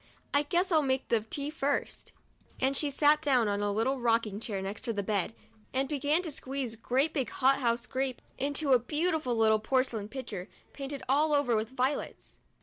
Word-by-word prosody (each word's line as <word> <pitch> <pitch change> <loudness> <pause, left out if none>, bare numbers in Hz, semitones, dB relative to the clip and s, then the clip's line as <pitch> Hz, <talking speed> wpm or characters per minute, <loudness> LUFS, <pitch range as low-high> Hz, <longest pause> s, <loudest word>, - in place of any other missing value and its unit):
I 285 - +5
guess 350 +5 0
I'll 315 -2 +5
make 265 -2 -1
the 230 -2 +3
tea 280 +7 -4
first; 285 -2 -2 0.2
" - - -27
and 265 +1 +1
she 295 +1 +2
sat 295 +2 +4
down 260 -7 +3
on 205 0 0
a 205 0 0
little 245 +6 0
rock 230 -1 +2
ing 205 -1 -5
chair 210 -3 -4
next 195 +2 -5
to 230 - 0
the 200 -1 -2
bed, 205 +2 -1 0.4
and 270 +1 +1
began 295 +4 +1
to 325 - -4
squeeze 265 -4 -4
great 265 +7 0
big 265 -5 -1
hothouse 245 -3 +2
grapes 260 -1 -3
into 280 +1 +1
a 250 - +6
beautiful 305 0 0
little 220 -1 +4
porcelain 230 -2 0
pitcher, 215 -7 -6 0.2
painted 275 0 -6
all 295 +4 +3
over 265 -5 +2
with 215 0 -1
violets. 260 +2 -3
260 Hz, 195 wpm, -30 LUFS, 225-285 Hz, 0.4 s, a